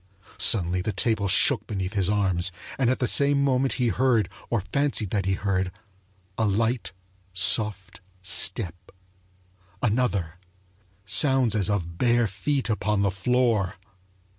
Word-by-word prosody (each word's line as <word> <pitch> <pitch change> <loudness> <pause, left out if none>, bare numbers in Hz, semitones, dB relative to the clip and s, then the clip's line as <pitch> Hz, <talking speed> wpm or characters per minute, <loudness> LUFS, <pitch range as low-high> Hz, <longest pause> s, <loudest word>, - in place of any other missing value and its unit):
Suddenly 90 -3 +3
the 110 - -2
table 110 -2 0
shook 95 - +4
beneath 95 -2 -4
his 95 -2 0
arms, 95 -3 0 0.3
and 125 -3 +2
at 130 - +1
the 125 - -1
same 140 +1 +3
moment 135 -1 +1
he 125 -3 0
heard, 115 -2 +1 0.2
or 115 -4 0
fancied 140 -8 0
that 100 -3 -1
he 95 - +1
heard, 95 -2 -1 0.7
a 110 - +2
light, 110 +2 -1 0.4
soft 95 -1 0 0.2
step 90 0 +2 1.1
another 100 -8 -1 0.7
sounds 130 -1 +2
as 105 -3 0
of 85 -4 -3
bare 120 -1 +2
feet 130 +7 -2
upon 105 -2 -1
the 100 - +1
floor! 110 -1 0
105 Hz, 135 wpm, -25 LUFS, 95-125 Hz, 1.1 s, shook